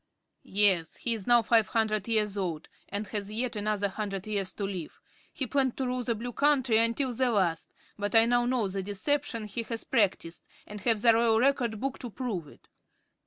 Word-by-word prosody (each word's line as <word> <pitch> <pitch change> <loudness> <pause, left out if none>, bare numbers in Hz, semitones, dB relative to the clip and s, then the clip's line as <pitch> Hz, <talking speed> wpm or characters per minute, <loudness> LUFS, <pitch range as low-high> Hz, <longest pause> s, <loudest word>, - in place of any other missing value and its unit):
"Yes; 190 -5 +3
he 235 - +2
is 215 -4 -5
now 240 -1 +5
five 225 -2 +3
hundred 215 -2 0
years 210 -3 +1
old, 170 -6 -4 0.2
and 205 +2 -3
has 205 -1 -4
yet 240 +2 -2
another 205 -1 0
hundred 195 -1 -5
years 200 -3 -2
to 205 - -5
live. 190 -5 -5 0.3
He 270 - -3
planned 265 -1 0
to 265 - -1
rule 250 0 -2
the 235 -1 -1
Blue 240 +3 -6
Country 265 -6 +3
until 235 +3 +1
the 255 +2 +1
last, 180 -7 -1 0.2
but 205 +2 -2
I 225 0 +7
now 240 0 +2
know 245 -4 +1
the 195 +1 -4
deception 230 +4 -1
he 210 +3 -4
has 230 0 -5
practiced 195 -8 -1 0.2
and 210 0 -9
have 225 -3 +1
the 230 -1 +7
Royal 225 -1 +3
Record 245 -4 +1
Book 270 +2 -3
to 245 - -6
prove 215 - -4
it. - - -18
220 Hz, 200 wpm, -28 LUFS, 200-245 Hz, 0.3 s, I